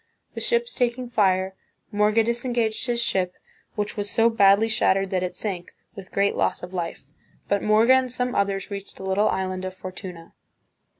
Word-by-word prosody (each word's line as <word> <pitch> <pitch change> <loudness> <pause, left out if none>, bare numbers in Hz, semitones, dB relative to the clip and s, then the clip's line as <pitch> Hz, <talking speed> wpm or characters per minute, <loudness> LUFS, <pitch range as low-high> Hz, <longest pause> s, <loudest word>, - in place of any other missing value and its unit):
The - - -5
ships 475 +1 +1
taking 245 0 -1
fire, 190 -4 +2 0.4
Morga 210 +2 +3
disengaged 235 0 -1
his 240 -1 0
ship, 185 -5 0 0.4
which 210 0 -2
was 205 0 -2
so 230 +2 +3
badly 200 0 +5
shattered 195 -3 +2
that 185 -1 0
it 180 0 -3
sank, 185 -3 -3 0.2
with 190 -1 -11
great 200 0 +1
loss - - 0
of 180 +1 -8
life; 170 -6 -4 0.4
but 200 -1 +1
Morga 220 +4 +5
and 260 -1 +2
some 250 0 -1
others 195 0 -1
reached 200 0 -7
the - - -9
little 195 +3 +2
island 185 -1 -2
of 185 0 -5
Fortuna. 185 -2 -9
200 Hz, 175 wpm, -24 LUFS, 185-230 Hz, 0.4 s, badly